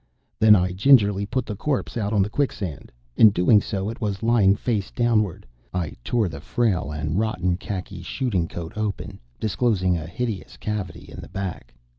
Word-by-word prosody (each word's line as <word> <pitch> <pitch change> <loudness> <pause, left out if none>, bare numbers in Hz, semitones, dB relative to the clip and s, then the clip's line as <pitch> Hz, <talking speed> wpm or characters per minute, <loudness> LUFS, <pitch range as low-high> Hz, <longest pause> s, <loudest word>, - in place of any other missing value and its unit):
Then 110 -1 +8
I 90 -2 +1
gingerly 100 -1 +4
put 130 +2 -1
the 105 - -5
corpse 135 +6 -2
out 105 -3 -1
on 105 -3 +3
the 100 - -3
quicksand. 100 - -3 0.2
In 110 - +8
doing 100 +2 +4
so, 100 -2 -3
it 115 +3 -6
was 100 -2 -2
lying 110 -4 +4
face 105 -3 -2
downward, 110 -6 0 0.3
I 85 -5 -2
tore 115 -4 +1
the 80 -4 -7
frail 100 -7 0
and 75 +4 -2
rotten 90 -5 0
khaki 95 0 -6
shooting 95 -3 -1
coat 85 -1 -7
open, 110 -2 -4 0.2
disclosing 95 -5 +1
a 80 - -7
hideous 110 +1 -4
cavity 105 -4 -4
in - - -8
the - - -11
back. 95 -3 -6
100 Hz, 175 wpm, -24 LUFS, 90-110 Hz, 0.3 s, Then